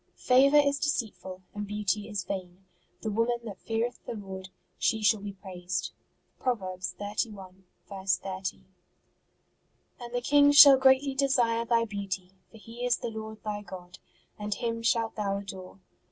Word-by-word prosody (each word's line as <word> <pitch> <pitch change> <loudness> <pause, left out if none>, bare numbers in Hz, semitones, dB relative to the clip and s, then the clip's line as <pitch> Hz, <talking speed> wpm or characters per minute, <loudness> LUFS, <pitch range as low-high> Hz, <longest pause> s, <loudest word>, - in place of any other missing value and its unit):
Favour 270 +3 +5
is 285 -1 +3
deceitful, 215 -10 -3
and 205 0 -5
beauty 210 0 -2
is 205 -3 -3
vain: 185 0 -6 0.4
the 220 - -3
woman 230 +3 +1
that 210 -5 -8
feareth 230 +2 -3
the - - -4
Lord, 190 -2 -8 0.3
she 220 -1 +1
shall 210 +1 +4
be 205 -1 -6
praised. 185 -2 -5 0.5
Prov. 250 -2 +1
xxxi. 190 +1 -5 0.6
30. 190 -1 -5 1.4
And 240 -1 -8
the 245 - -1
King 285 +2 +5
shall 280 -2 +10
greatly 265 +1 +4
desire 245 -4 +2
thy 230 0 +2
beauty: 195 -3 -5 0.2
for 225 - -15
He 230 +3 -9
is 245 -1 +2
the 235 - -4
Lord 220 0 -8
thy 210 -1 -3
God, 180 -2 -11 0.4
and 210 -1 -2
Him 230 +1 -3
shalt 230 -1 +1
thou 200 -2 -1
adore. 190 -1 -9
215 Hz, 150 wpm, -28 LUFS, 195-240 Hz, 1.4 s, shall